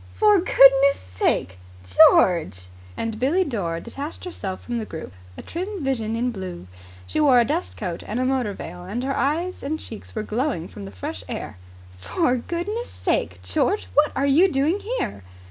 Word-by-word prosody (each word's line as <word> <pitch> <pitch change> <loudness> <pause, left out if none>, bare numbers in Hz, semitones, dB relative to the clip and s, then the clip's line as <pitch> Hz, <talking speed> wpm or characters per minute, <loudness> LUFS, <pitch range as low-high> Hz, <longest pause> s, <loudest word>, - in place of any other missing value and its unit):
"For 420 -2 +5
goodness' 275 -4 +6
sake, 90 0 -1 0.3
George." 95 - +4 0.3
And 225 -1 -3
Billie 305 +10 +2
Dore 190 - -2
detached 280 - -7
herself 195 - -5
from 240 -1 -3
the 220 - -4
group, 160 - -8 0.2
a - - -8
trim 370 +1 -5
vision 230 -5 -1
in 245 +2 0
blue. 185 - -7 0.4
She - - -2
wore 275 -5 +6
a 235 - +4
dust 320 +7 -2
coat 175 -5 -4
and 220 +4 -2
a 255 - +1
motor 255 -5 0
veil, 175 -1 -8
and 210 +7 -4
her 270 +1 -1
eyes 335 +6 -1
and 310 +3 -3
cheeks 220 +1 -10
were 215 - -2
glowing 220 - -2
from 100 - -9
the 100 - -8
fresh 95 -1 -6
air. - - -5 0.4
"For 255 - +1
goodness' 365 - -4
sake, - - -2
George, 315 +8 0
what 295 +1 +4
are 275 - +1
you 325 +7 +5
doing 290 +8 +1
here?" 435 - -3
255 Hz, 180 wpm, -23 LUFS, 185-310 Hz, 0.4 s, goodness